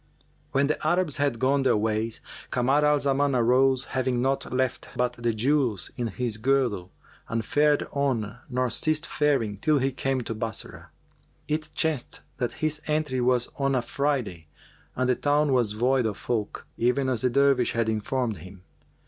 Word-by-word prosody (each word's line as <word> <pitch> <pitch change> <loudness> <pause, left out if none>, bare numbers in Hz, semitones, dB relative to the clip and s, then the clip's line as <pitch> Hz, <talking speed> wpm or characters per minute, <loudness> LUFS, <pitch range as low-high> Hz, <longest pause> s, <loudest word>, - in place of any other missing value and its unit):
When 135 +1 +2
the 150 - -2
Arabs 175 -3 +1
had 140 -4 0
gone 135 +3 +2
their 130 - +3
ways, 110 +1 -1 0.3
Kamar 135 +4 +2
al 150 0 +4
Zaman 140 -1 +1
arose, 130 +2 +3
having 130 -2 -1
naught 135 +2 -1
left 130 0 -1
but 125 0 +1
the 120 -1 -1
jewels 120 -2 +1
in 120 -2 -2
his 115 0 -2
girdle, 120 -7 0 0.4
and 115 -1 -2
fared 150 +2 +2
on 125 -7 -1
nor 125 -1 0
ceased 155 +4 0
faring 135 -9 0
till 155 +7 +2
he 135 0 +1
came 135 0 -1
to 115 - -4
Bassorah. 110 0 -6 0.6
It 155 +1 -2
chanced 155 -6 0 0.2
that 125 -2 -2
his 155 -1 0
entry 150 -4 0
was 125 0 +2
on 135 -1 +1
a 125 - +2
Friday 125 - -2 0.5
and 130 0 0
the 125 - +3
town 145 +1 +2
was 120 -5 +2
void 125 +2 +2
of 105 - -4
folk, 110 -4 -3
even 125 +3 +2
as 125 -4 +1
the 125 - +2
Dervish 135 -1 +3
had 115 -1 0
informed 110 +1 -1
him. 95 0 -13
130 Hz, 170 wpm, -26 LUFS, 115-140 Hz, 0.6 s, al